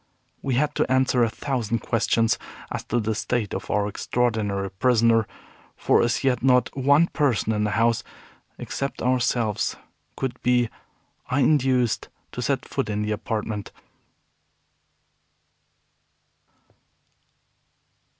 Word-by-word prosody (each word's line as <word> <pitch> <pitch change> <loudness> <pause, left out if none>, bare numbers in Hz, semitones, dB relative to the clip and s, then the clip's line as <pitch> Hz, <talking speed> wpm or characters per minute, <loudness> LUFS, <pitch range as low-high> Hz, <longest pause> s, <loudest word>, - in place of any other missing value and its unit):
We 135 -3 -1
had 150 +3 +1
to - - 0
answer 130 -1 +3
a 115 - +2
thousand 115 -2 -2
questions 115 0 +1 0.3
as - - -3
to 120 - 0
the 110 0 -1
state 110 0 -2
of - - -5
our 105 0 +1
extraordinary 105 -3 -1
prisoner, 115 +1 +3 0.5
for - - +3
as 120 +3 0
yet 130 -3 +2
not 125 -1 +3
one 140 +4 +4
person 125 - 0
in 105 0 0
the - - 0
house 115 0 +2 0.5
except 140 0 -4
ourselves 120 -3 +1 0.4
could 130 -2 -4
be 125 -1 +2 0.6
induced 130 -3 +2 0.2
to - - -5
set - - -1
foot - - -2
in 105 0 -1
the 105 - -2
apartment. 105 -1 -3
120 Hz, 115 wpm, -24 LUFS, 110-130 Hz, 0.6 s, one